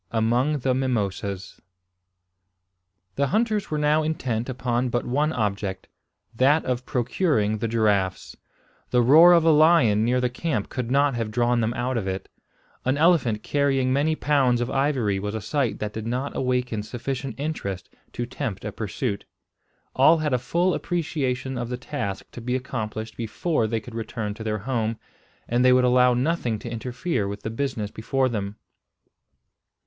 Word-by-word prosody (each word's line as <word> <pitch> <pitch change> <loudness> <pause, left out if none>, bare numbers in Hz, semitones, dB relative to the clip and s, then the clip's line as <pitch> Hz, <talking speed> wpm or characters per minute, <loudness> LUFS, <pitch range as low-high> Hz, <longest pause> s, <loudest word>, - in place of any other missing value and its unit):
AMONG 120 +6 +1
THE 130 +1 +1
MIMOSAS. 100 -7 -2 1.6
The 140 0 +2
hunters 215 - 0
were 155 - -1
now 150 +1 +3
intent 130 -7 -2
upon 125 0 -1
but 120 0 -1
one 145 +5 +1
object, 100 -5 -2 0.5
that 140 +6 +3
of 125 0 -2
procuring 120 - 0
the 115 - -1
giraffes. 105 -4 0 0.5
The 125 -1 +3
roar 160 +8 +8
of 170 -2 +5
a 165 - +6
lion 150 -9 +5
near 125 +2 +2
the 125 - +1
camp 125 -3 -2
could 125 -2 -4
not 140 +1 +3
have 115 -2 -2
drawn 120 +1 +1
them 115 +2 -1
out 125 +1 -1
of 100 -4 -2
it. 95 0 -4 0.5
An 130 +2 +1
elephant 145 -10 +3
carrying 135 -3 +1
many 150 +3 +2
pounds 135 -6 +2
of 120 +1 -2
ivory 130 -8 +1
was 105 +2 -4
a - - -2
sight 125 +4 -1
that 105 0 -4
did 110 0 -5
not 125 +4 -2
awaken 125 -4 -1
sufficient 130 +4 -5
interest 100 - -4 0.3
to 120 - -3
tempt 120 -6 -5
a 105 - -3
pursuit. 105 +1 -3 0.7
All 150 +5 +6
had 155 -3 -1
a 125 - +2
full 175 +8 +1
appreciation 135 -6 -2
of 120 -1 -4
the 125 - -3
task 125 -7 -4
to 120 - -9
be 125 +2 -1
accomplished 110 -4 -4
before 115 +3 -1
they 115 +1 -1
could 115 +2 -12
return 110 -2 -4
to 110 - -8
their 110 -1 -1
home, 115 0 -2 0.5
and 120 +1 +2
they 130 - +6
would 125 0 +5
allow 125 0 +4
nothing 125 -4 0
to 115 +2 -8
interfere 125 - -2
with 100 +1 -6
the 110 - -3
business 115 -4 -3
before 130 +4 0
them. 100 -3 -3
125 Hz, 165 wpm, -24 LUFS, 110-140 Hz, 1.6 s, roar